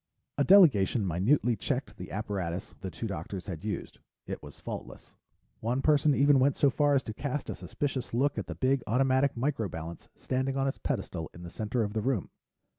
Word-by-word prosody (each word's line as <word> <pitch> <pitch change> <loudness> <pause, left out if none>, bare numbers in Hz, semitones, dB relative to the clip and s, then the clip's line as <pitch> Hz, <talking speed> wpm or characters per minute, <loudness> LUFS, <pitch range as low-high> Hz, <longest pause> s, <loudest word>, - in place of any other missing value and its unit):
A - - +5
delegation 130 - +6
minutely 110 - +2
checked - - -3
the - - -7
apparatus 95 -4 -3
the 95 - -4
two 95 - -6
doctors 95 -1 -5
had 90 -3 -6
used; 105 -1 -4 0.3
it - - -5
was - - -12
faultless. - - -8 0.5
One 125 +4 -1
person 150 -1 +4
even 140 0 +5
went 135 +1 +3
so 140 - +4
far 145 +1 +3
as 135 - +2
to 110 - -5
cast 145 +4 -3
a - - -2
suspicious 135 -3 -3
look 140 +5 +1
at - - -5
the - - -5
big 135 0 +2
automatic 130 +3 +2
micro 120 -5 0
balance 85 +1 -7
standing 130 +1 -1
on 135 0 +1
its 135 - -3
pedestal 95 - -3
in 85 - -10
the 85 - -8
center 110 +3 -1
of 105 -1 -3
the 110 - 0
room. 115 - -1
125 Hz, 195 wpm, -29 LUFS, 100-135 Hz, 0.5 s, delegation